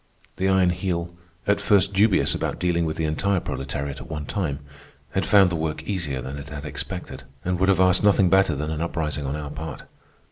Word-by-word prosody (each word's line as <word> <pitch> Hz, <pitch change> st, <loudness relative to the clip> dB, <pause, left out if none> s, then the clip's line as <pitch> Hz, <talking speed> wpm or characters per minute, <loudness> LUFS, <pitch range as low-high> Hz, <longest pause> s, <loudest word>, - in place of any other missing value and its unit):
The 95 Hz, -, +1 dB
Iron 95 Hz, -2 st, +4 dB
Heel, 90 Hz, -1 st, -2 dB, 0.3 s
at 100 Hz, 0 st, +2 dB
first 100 Hz, -1 st, +3 dB
dubious 100 Hz, +1 st, +3 dB
about -, -, -2 dB
dealing 85 Hz, -1 st, +1 dB
with 80 Hz, -, -3 dB
the 80 Hz, -, 0 dB
entire 95 Hz, +5 st, +1 dB
proletariat 70 Hz, -1 st, -4 dB
at -, -, -11 dB
one 75 Hz, -2 st, -4 dB
time, 80 Hz, -5 st, -2 dB, 0.5 s
had -, -, -1 dB
found 100 Hz, -3 st, +6 dB
the -, -, -1 dB
work 80 Hz, -1 st, -2 dB
easier 75 Hz, -11 st, -3 dB
than 65 Hz, +2 st, -6 dB
it 70 Hz, +1 st, -9 dB
had 75 Hz, -1 st, -7 dB
expected, 75 Hz, -, -5 dB, 0.2 s
and 90 Hz, 0 st, 0 dB
would 95 Hz, +1 st, +3 dB
have 95 Hz, -2 st, +4 dB
asked 95 Hz, 0 st, +4 dB
nothing 100 Hz, -2 st, +5 dB
better 95 Hz, -4 st, +4 dB
than 75 Hz, +3 st, -3 dB
an 80 Hz, 0 st, -3 dB
uprising 75 Hz, -4 st, -2 dB
on 70 Hz, -, -2 dB
our 75 Hz, -1 st, -5 dB
part. 75 Hz, 0 st, -6 dB
85 Hz, 210 wpm, -24 LUFS, 75-95 Hz, 0.5 s, found